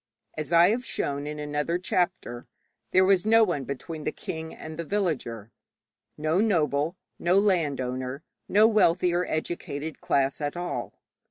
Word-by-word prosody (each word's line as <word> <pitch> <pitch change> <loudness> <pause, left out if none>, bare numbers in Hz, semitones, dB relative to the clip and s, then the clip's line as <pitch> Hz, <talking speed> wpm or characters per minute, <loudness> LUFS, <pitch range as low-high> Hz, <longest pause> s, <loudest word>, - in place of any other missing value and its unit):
As 155 +1 -5
I 170 +1 +7
have 240 +4 0
shown 145 - -3
in 150 0 -5
another 150 +3 -1
chapter, 180 -9 -2 0.4
there 185 0 +5
was 190 -2 +4
no 225 +1 +5
one 160 -10 -1
between 150 +4 -6
the - - -1
king 160 0 -6
and 155 0 -9
the - - -1
villager 145 - -2 0.7
no 155 +4 +1
noble, 160 - +1 0.2
no 175 +2 +3
landowner, 140 -8 0 0.3
no 210 +2 +6
wealthy 185 -5 +3
or 180 +1 0
educated 155 -1 -4
class 140 +1 +1
at 145 +3 -2
all. 175 0 -4
160 Hz, 150 wpm, -27 LUFS, 145-185 Hz, 0.7 s, I